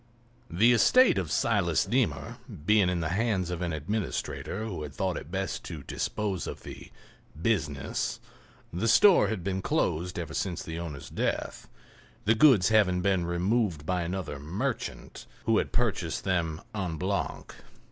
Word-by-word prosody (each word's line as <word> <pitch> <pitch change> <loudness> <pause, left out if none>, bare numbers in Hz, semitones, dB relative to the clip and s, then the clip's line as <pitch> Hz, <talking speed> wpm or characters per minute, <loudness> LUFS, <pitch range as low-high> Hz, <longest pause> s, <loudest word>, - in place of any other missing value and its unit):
The 110 +8 +4
estate 240 - +5
of 85 -6 -4
Silas 85 0 +2
Deemer 120 +1 -1 0.3
being 105 -2 +4
in 90 -1 -1
the 80 - -1
hands 95 -2 0
of 90 0 -4
an 85 -1 -1
administrator 105 +6 -3
who 95 -8 -5
had 75 -2 -7
thought - - -1
it - - -7
best 95 +2 -3
to 80 -5 -7
dispose 100 +2 -3
of - - -7
the - - -10 0.5
"business" 75 -8 -1 0.5
the 90 +7 -1
store 185 - +6
had 110 -6 -3
been 95 0 -2
closed 90 -1 -1
ever 85 -2 -4
since 90 -3 -2
the 80 +1 -5
owner's 75 -5 -7
death, - - -2 0.6
the 110 - +5
goods 110 -6 +6
having 100 -5 +3
been 95 -2 +1
removed 90 -2 0
by 90 +1 0
another 85 -4 -4
"merchant" 80 +8 -4 0.2
who 115 -1 +3
had - - -2
purchased 100 -9 -1
them 85 -4 -1
en 90 -6 -3
bloc. 95 +2 -3
90 Hz, 155 wpm, -28 LUFS, 85-105 Hz, 0.6 s, store